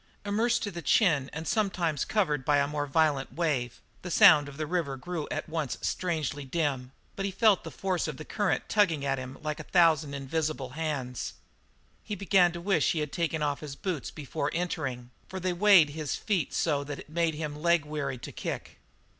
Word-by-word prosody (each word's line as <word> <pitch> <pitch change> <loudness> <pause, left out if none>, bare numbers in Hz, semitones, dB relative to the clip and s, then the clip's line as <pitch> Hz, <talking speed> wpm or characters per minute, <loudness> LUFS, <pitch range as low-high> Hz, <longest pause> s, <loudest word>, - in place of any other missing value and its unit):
Immersed 235 +4 +1
to 205 - -3
the 170 -2 -6
chin, 155 - +3
and 160 +1 -6
sometimes 180 - 0
covered 150 -11 0
by 145 +2 +3
a 140 - +3
more 145 0 -2
violent 145 -2 +1
wave, 140 -8 -1 0.2
the 180 - -6
sound 145 -3 +7
of 140 - -12
the 155 - -2
river 155 -5 -2
grew 160 +3 -4
at 155 - -3
once 155 -5 -2
strangely 155 -5 -2
dim, 135 -3 -2 0.2
but 195 - -3
he 200 - 0
felt 205 0 +3
the - - -6
force 185 -3 -2
of 150 -4 -5
the 155 - -8
current 205 -3 -1
tugging 170 -9 +2
at 135 -1 0
him 130 +1 -7
like 150 -1 -3
a - - -5
thousand 160 -5 +4
invisible 140 -1 -2
hands. 140 -5 -3 0.7
He 210 - -4
began 190 -2 +4
to 175 - -5
wish 195 +2 +2
that - - +3
he 165 - -1
had 150 -2 -3
taken 165 -2 -1
off 145 -1 0
his 145 -3 -7
boots 180 -4 -3
before 145 -1 -3
entering, 135 -8 -3 0.2
for 190 - -6
they 185 0 -1
weighted 175 -6 +6
his 155 -2 -3
feet 190 -9 -1
so 145 -4 0
that 145 0 -6
it - - -11
made 165 0 0
him 150 -1 -4
leg 170 -2 +3
weary 145 -3 -3
to 120 - -8
kick. - - -6
155 Hz, 205 wpm, -29 LUFS, 140-175 Hz, 0.7 s, sound